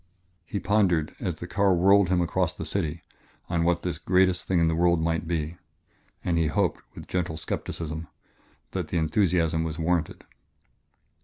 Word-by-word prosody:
He 100 - -3
pondered, 95 -8 +1
as 90 -4 -2
the 85 - -7
car 95 +1 +2
whirled 100 +1 +5
him 90 -1 +2
across 85 - 0
the - - -5
city, 85 -4 -2 0.5
on 85 -1 +1
what 85 0 +1
this 85 -3 -3
greatest 90 0 +2
thing 95 -2 +2
in 85 - +3
the 80 - +1
world 85 0 +3
might 80 0 -1
be. 80 0 -2 0.7
And 85 -2 +1
he 80 - +2
hoped 75 - 0
with - - -9
gentle 90 -3 -2
skepticism 80 0 -4 0.6
that - - -3
the - - -2
enthusiasm 80 -1 +2
was 80 -1 -4
warranted. 85 -1 -1
85 Hz, 165 wpm, -26 LUFS, 80-90 Hz, 0.7 s, whirled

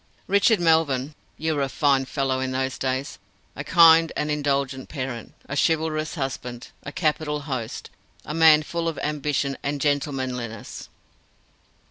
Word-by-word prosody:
Richard 200 +2 +3
Melvyn, 155 -5 +2 0.2
you 160 0 -1
were 145 - -1
a 135 - 0
fine 140 -2 +2
fellow 135 -1 -1
in 130 0 -2
those 130 0 -2
days! 130 +1 -2 0.4
A - - -5
kind 165 -1 +6
and 150 - -1
indulgent 140 -2 -1
parent, 130 -6 -6
a 140 - -4
chivalrous 155 0 0
husband, 125 -4 -5
a 140 - -7
capital 150 -2 -1
host, 130 -6 -5 0.3
a 150 - -5
man 155 -1 +6
full 170 +2 -3
of 165 - -2
ambition 145 -2 -1
and 145 +1 -2
gentlemanliness. 130 -6 -3
145 Hz, 140 wpm, -24 LUFS, 130-155 Hz, 0.4 s, kind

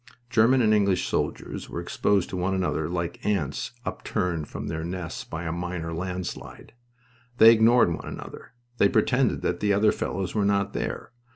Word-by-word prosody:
German 120 +3 +4
and 110 -1 +4
English 100 -3 +2
soldiers - - -3
were - - -4
exposed 100 -3 +1
to - - -6
one 90 +1 0
another 90 -4 -1
like 85 -1 -4
ants 80 -10 -1
upturned 85 -5 -2
from - - -6
their 80 0 -4
nests 85 -1 -5
by 80 +2 -6
a 80 - -3
minor 85 -1 -4
landslide. 90 +4 -6 0.6
They 115 -2 +9
ignored 115 -4 +5
one - - -7
another. - - -9 0.3
They 100 - +5
pretended 125 +4 +2
that 90 - -1
the 105 -1 +2
other 105 +2 +4
fellows 95 -1 -3
were 105 - +1
not 100 0 +1
there. - - -4
95 Hz, 170 wpm, -26 LUFS, 85-105 Hz, 0.6 s, They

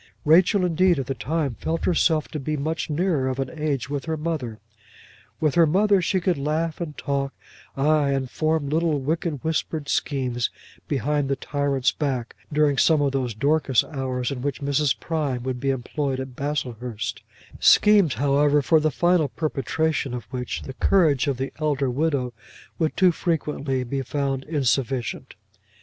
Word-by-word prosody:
Rachel 180 +5 +5
indeed, 180 +1 +3
at 135 - -2
the 135 - -2
time, 140 +2 -2
felt 165 +1 -2
herself 160 -3 +2
to 155 - -5
be 150 +2 -2
much 160 +4 -2
nearer 155 -3 +1
of 130 0 -2
an 135 -1 -3
age 150 -6 -2
with 140 0 -4
her 160 -1 -2
mother. 150 -8 -3 0.8
With 155 -3 +1
her 170 -2 +5
mother 200 +4 +3
she 185 +2 +1
could 175 -4 0
laugh 155 +4 -1
and 155 -3 -5
talk, 140 -1 -2 0.4
ay, 145 +1 +3
and 135 -1 0
form 155 +2 0
little 155 0 +1
wicked 150 0 -2
whispered 160 -1 -2
schemes 125 -4 0 0.4
behind 145 0 0
the 135 - +1
tyrant's 140 -2 0
back, 130 -6 -3 0.2
during 145 -2 +2
some 160 -2 +4
of 140 -1 +1
those 130 -5 -2
Dorcas 140 0 +2
hours, 130 -4 -3
in 130 -3 -4
which 140 0 -2
Mrs. 140 0 +1
Prime 145 -7 -2
would 130 -1 -3
be 135 - -1
employed 135 +1 -2
at 130 -1 -6
Baslehurst; 125 -6 -4 0.4
schemes, 205 -8 +5
however, 145 +3 +3
for 160 +3 +4
the 155 0 +2
final 175 0 +2
perpetration 150 -1 -1
of 120 - -5
which, 125 -2 -4
the 135 - -7
courage 150 -3 +3
of 140 -3 0
the 135 +1 -4
elder 140 -4 0
widow 135 -3 0 0.5
would 160 -2 0
too 185 -2 +5
frequently 150 -6 -1
be 135 +2 -3
found 135 0 -2
insufficient. 135 -4 -1
145 Hz, 165 wpm, -24 LUFS, 130-160 Hz, 0.8 s, Rachel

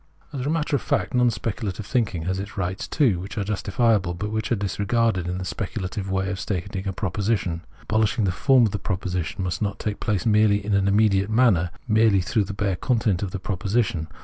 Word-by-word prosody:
As 135 -3 -3
a - - +1
matter 155 -1 0
of 135 - 0
fact, - - -1
non 125 -1 +4
speculative 110 -3 -3
thinking 105 -9 0
has 95 +2 -1
its 100 +1 -7
rights 95 0 -2
too, 120 - +2
which 95 +5 -7
are 105 - 0
justifiable, 100 -2 +1
but 105 +4 -3
are - - +4
disregarded 100 -1 0
in 90 +1 -2
the 95 - -4
speculative 95 +1 -4
way 95 0 0
of 95 - -4
stating 95 -1 -3
a - - 0
proposition. 95 -2 -1 0.2
Abolish 110 +1 +1
ing 110 - +2
the 95 - +2
form 130 +6 +4
of 105 - 0
the 100 - -3
proposition 90 -1 -3
must 90 +3 -2
not 100 -1 -1
take 105 0 -3
place 105 -5 -1
merely 105 -2 +3
in 105 - -1
an 100 0 +3
immediate 100 -1 +3
manner, 110 -7 +3 0.2
merely 110 -3 +4
through 105 +3 0
the 100 - -5
bare 100 -2 -1
content 110 -7 +1
of 100 - -2
the 95 - -4
proposition. 95 -2 -1
100 Hz, 210 wpm, -24 LUFS, 95-110 Hz, 0.2 s, non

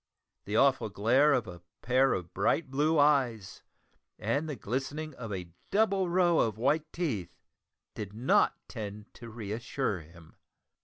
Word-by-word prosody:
The 105 - -3
awful 135 -4 +3
glare 120 +9 +3
of 125 -5 +2
a 85 -1 -9 0.2
pair 130 +2 +3
of 90 -2 -5
bright 155 -5 0
blue 150 +4 +2
eyes, 130 -9 +2 0.6
and 140 +9 -1
the 150 - -3
glistening 135 +7 -4
of 115 -4 -7
a 90 -3 -5 0.2
double 195 -3 +2
row 175 -1 +3
of 110 -2 +1
white 150 +6 +1
teeth, 130 - -3 0.6
did 105 -2 -6
not 115 +5 +2
tend 105 -2 -8
to 120 -1 -11
re 110 -3 -7
assure 115 -2 -2
him. 80 0 -16
125 Hz, 150 wpm, -30 LUFS, 105-150 Hz, 0.6 s, awful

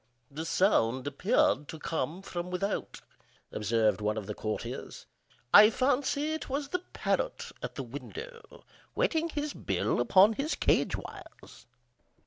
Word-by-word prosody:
"The 155 +3 -5
sound 130 - +2
appeared 145 0 +1
to 160 - -7
come 160 +3 -3
from 175 -1 -5
without," 195 +3 -3 0.5
observed 110 0 +1
one 105 +1 0
of 105 - -4
the 105 - -4
courtiers. 110 +1 -5 0.5
"I 210 +1 +10
fancy 280 +5 0
it 315 - -5
was 280 +1 -2
the 360 - -1
parrot - - -2
at - - -6
the - - -4
window, 470 -3 -9 0.3
whetting 335 -9 +1
his 295 -1 -3
bill - - -1
upon 195 +3 +6
his 285 +7 -2
cage - - +2
wires." - - -12
195 Hz, 135 wpm, -30 LUFS, -, 0.5 s, I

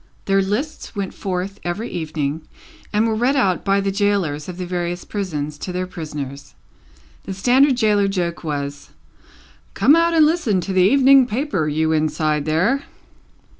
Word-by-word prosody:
Their 195 0 +3
lists 225 +9 -3
went 200 -2 -3
forth 190 +1 -4
every 195 +7 -3
evening, 155 -2 -3 0.5
and 215 +2 +2
were 225 - 0
read 245 +5 +1
out 195 -10 +1
by 195 0 +2
the 195 0 -1
gaolers 195 -7 0
of 180 - -7
the 180 - -4
various 175 0 -3
prisons 150 -7 -4
to 185 - -5
their 180 +1 -2
prisoners. 150 -6 -7 0.7
The 190 - -5
standard 255 +6 +3
gaoler 210 -3 +3
joke 175 -4 -2
was, 145 -2 -4 0.9
"Come 290 - +5
out 335 0 +2
and 315 -2 +6
listen 300 - +1
to 190 - -4
the 185 - +3
Evening 265 +5 +6
Paper, 225 - -1
you 160 +1 0
inside 155 -1 0
there!" 185 - +1
190 Hz, 160 wpm, -20 LUFS, 160-220 Hz, 0.9 s, and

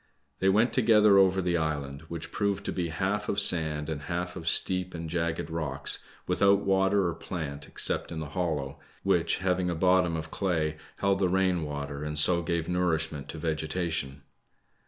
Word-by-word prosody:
They 95 - +3
went 110 +5 +3
together 105 -4 +5
over 95 -1 +3
the 85 -1 +1
island, 70 -3 -3
which 80 0 -6
proved 100 -1 -1
to - - -2
be 90 -2 -2
half 95 +5 -2
of 100 - 0
sand 80 -5 +5
and 80 -3 -4
half 90 0 -3
of 85 -3 -7
steep 90 0 +1
and 85 0 -5
jagged 80 -1 -2
rocks, 80 -2 0 0.3
without 100 0 +3
water 95 0 +2
or 85 - -2
plant 70 -4 -6
except - - -1
in 80 - -5
this 80 -2 -6
hollow, 75 -6 -3 0.2
which, 85 -4 +1
having 90 -1 +1
a 85 - -2
bottom 90 0 +2
of 80 0 -7
clay, 80 -5 -1 0.2
held 100 -1 0
the 95 -2 +2
rain 95 -1 +1
water, 70 -1 -5
and 75 0 -4
so 85 +3 +4
gave 85 -1 -2
nourishment 80 -5 -1
to - - -6
^getation. 80 -3 -3
85 Hz, 180 wpm, -28 LUFS, 80-95 Hz, 0.3 s, together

